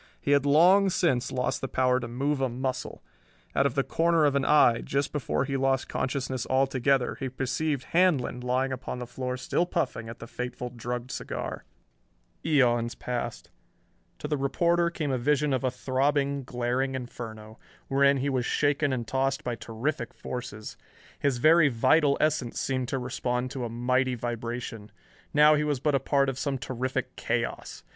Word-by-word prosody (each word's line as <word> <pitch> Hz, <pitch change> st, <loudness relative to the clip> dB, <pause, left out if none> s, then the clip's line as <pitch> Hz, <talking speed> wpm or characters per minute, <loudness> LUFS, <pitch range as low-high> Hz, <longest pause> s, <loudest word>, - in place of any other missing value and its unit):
He 140 Hz, -, -1 dB
had 140 Hz, 0 st, +4 dB
long 180 Hz, +7 st, +6 dB
since 160 Hz, -9 st, +1 dB
lost 125 Hz, -1 st, -1 dB
the 135 Hz, -, -2 dB
power 125 Hz, -1 st, +2 dB
to 120 Hz, -, -5 dB
move 135 Hz, +4 st, -1 dB
a 130 Hz, -, +1 dB
muscle. 130 Hz, +1 st, -4 dB, 0.5 s
Out 140 Hz, -, +4 dB
of 125 Hz, -, -5 dB
the 135 Hz, -, +2 dB
corner 165 Hz, 0 st, +2 dB
of 140 Hz, -1 st, +2 dB
an 140 Hz, -, +2 dB
eye, 135 Hz, -5 st, +5 dB
just 140 Hz, 0 st, -1 dB
before 140 Hz, -2 st, -1 dB
he 135 Hz, 0 st, -3 dB
lost 135 Hz, 0 st, +1 dB
consciousness 130 Hz, -2 st, -2 dB
altogether, 135 Hz, -1 st, +2 dB
he 135 Hz, -2 st, -3 dB
perceived 135 Hz, +2 st, -2 dB
Handlon 165 Hz, -9 st, +2 dB
lying 130 Hz, +2 st, 0 dB
upon 130 Hz, -1 st, -5 dB
the 125 Hz, -, -5 dB
floor 125 Hz, +1 st, -4 dB
still 170 Hz, +7 st, 0 dB
puffing 115 Hz, -8 st, -2 dB
at 115 Hz, -, -8 dB
the -, -, -9 dB
fateful 125 Hz, +1 st, -5 dB
drugged 120 Hz, +1 st, -4 dB
cigar. -, -, -5 dB, 0.8 s
Eons 120 Hz, -6 st, +2 dB
passed. 120 Hz, -, -5 dB, 0.7 s
To -, -, -5 dB
the 150 Hz, -1 st, 0 dB
reporter 170 Hz, +5 st, +2 dB
came 155 Hz, -4 st, -3 dB
a 130 Hz, -, 0 dB
vision 145 Hz, +2 st, +1 dB
of 130 Hz, -, 0 dB
a 130 Hz, -, +2 dB
throbbing, 140 Hz, +1 st, 0 dB
glaring 125 Hz, +2 st, -1 dB
inferno, 110 Hz, -3 st, -8 dB, 0.3 s
wherein 140 Hz, +1 st, +4 dB
he 135 Hz, +2 st, -1 dB
was 130 Hz, -2 st, 0 dB
shaken 145 Hz, +2 st, +1 dB
and 120 Hz, -3 st, -2 dB
tossed 135 Hz, +2 st, 0 dB
by 120 Hz, -, -2 dB
terrific 120 Hz, +2 st, -4 dB
forces. 120 Hz, -4 st, -7 dB, 0.4 s
His 140 Hz, -3 st, +1 dB
very 155 Hz, +3 st, +5 dB
vital 140 Hz, +4 st, +3 dB
essence 150 Hz, -6 st, 0 dB
seemed 130 Hz, -2 st, -1 dB
to 135 Hz, -, -2 dB
respond 125 Hz, 0 st, -2 dB
to 130 Hz, -3 st, -4 dB
a -, -, -4 dB
mighty 125 Hz, +2 st, +1 dB
vibration. 115 Hz, -2 st, -5 dB, 0.4 s
Now 150 Hz, +1 st, +6 dB
he 150 Hz, 0 st, +2 dB
was 145 Hz, -3 st, 0 dB
but 150 Hz, +2 st, +1 dB
a 135 Hz, -, +3 dB
part 140 Hz, +1 st, +2 dB
of 135 Hz, -1 st, -3 dB
some 140 Hz, -1 st, -1 dB
terrific 130 Hz, +1 st, -3 dB
chaos. -, -, -3 dB
130 Hz, 175 wpm, -27 LUFS, 125-140 Hz, 0.8 s, long